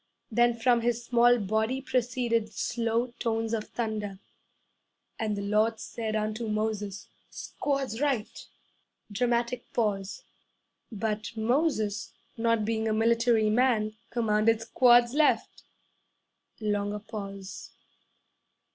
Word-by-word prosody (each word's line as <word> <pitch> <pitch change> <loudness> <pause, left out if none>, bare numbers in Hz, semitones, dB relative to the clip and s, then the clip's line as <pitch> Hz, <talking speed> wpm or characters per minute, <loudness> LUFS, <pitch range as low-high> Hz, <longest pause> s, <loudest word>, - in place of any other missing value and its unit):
Then 240 +1 +3
from 235 +1 +3
his 240 0 -1
small 240 0 +5
body 220 +4 0
proceeded 240 -4 0
slow 235 +1 -1
tones 225 -1 -1
of 215 -1 -1
thunder, 215 -4 -3 1.0
'And 215 -2 -1
the 200 - -3
Lord 215 +2 +1
said 220 -2 -4
unto 215 +2 -2
Moses, 210 -2 -2 0.2
"Squads 275 -4 -3
right!" 270 -7 -1 0.6
(Dramatic 240 +2 -1
pause.) 205 -4 -1 0.7
'But 215 +1 -3
Moses 220 -3 0 0.2
not 230 -1 +1
being 220 0 -1
a 220 - +1
military 230 0 +3
man 220 -3 +2
commanded, 225 -1 +2
"Squads 240 +1 +5
left!" 300 0 +1 0.9
(Longer 205 -1 -1
pause.) 200 -2 -8
225 Hz, 100 wpm, -28 LUFS, 215-240 Hz, 1.0 s, small